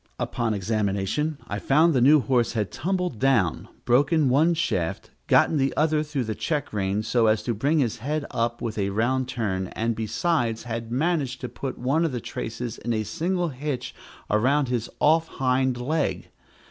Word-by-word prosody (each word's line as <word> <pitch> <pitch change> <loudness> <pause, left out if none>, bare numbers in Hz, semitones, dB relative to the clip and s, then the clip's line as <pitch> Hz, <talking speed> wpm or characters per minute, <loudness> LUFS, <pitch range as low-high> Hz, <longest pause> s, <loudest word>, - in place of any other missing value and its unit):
Upon 115 -3 -1
examination 105 +8 -1
I 100 0 -3
found 155 +9 +4
the 130 - +2
new 145 +3 +6
horse 125 -4 +1
had 105 -4 -2
tumbled 180 - -2
down, 125 -11 +2 0.2
broken 140 +4 +3
one 155 +6 +3
shaft, 90 - -2 0.2
gotten 160 - +4
the 135 -1 0
other 155 0 +2
through 150 -4 -2
the 110 -1 -3
check 150 +2 -2
rein 100 +1 -1
so 115 +1 +2
as 110 0 +2
to 120 - -1
bring 140 +9 +1
his 125 -7 +1
head 145 +5 -2
up 120 0 -1
with 110 -2 -3
a 100 0 0
round 120 +5 0
turn, 95 -7 -2
and 115 0 -1
besides 115 - -1
had 115 -1 -5
managed 140 -2 0
to 125 - -4
put 135 - -5
one 140 +7 +1
of 160 -5 0
the 125 - -2
traces 115 +1 -5
in 120 - -2
a 110 -1 0
single 175 - -1
hitch 135 -2 -4 0.3
around 130 +6 +2
his 120 -2 -2
off 160 +2 +4
hind 130 -1 0
leg. 125 - -2
125 Hz, 180 wpm, -25 LUFS, 110-150 Hz, 0.3 s, new